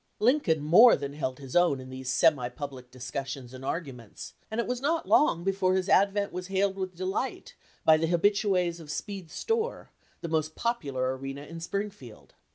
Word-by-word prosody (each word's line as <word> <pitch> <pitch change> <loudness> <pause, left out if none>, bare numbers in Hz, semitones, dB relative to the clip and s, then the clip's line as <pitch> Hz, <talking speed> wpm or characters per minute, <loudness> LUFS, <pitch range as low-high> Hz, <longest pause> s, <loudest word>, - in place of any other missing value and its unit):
Lincoln 215 - +2
more 220 +11 +8
than 140 0 -5
held 130 -3 -3
his 135 -3 -9
own 175 -6 +4
in 130 0 -10
these 130 0 -4
semi 140 -6 +3
public 130 -1 -8
discussions 130 0 -6
and 130 0 -9
arguments, 135 - -6 0.2
and 220 +2 -3
it 235 - +1
was 250 0 -3
not 325 +4 0
long 170 - +4
before 190 -1 +1
his 190 0 0
advent 200 +1 +3
was 180 0 -5
hailed 195 0 +1
with 185 -2 -4
delight 255 - -3 0.3
by 160 0 +7
the 165 +1 0
habitues 180 -1 +2
of 155 -3 -11
Speed's 190 -2 -6
store, 455 +1 -2 0.3
the - - -4
most 155 -1 -1
popular 140 - -1
arena 135 +1 -6
in 165 +3 -9
Springfield. 175 - -6
170 Hz, 175 wpm, -28 LUFS, 135-200 Hz, 0.3 s, more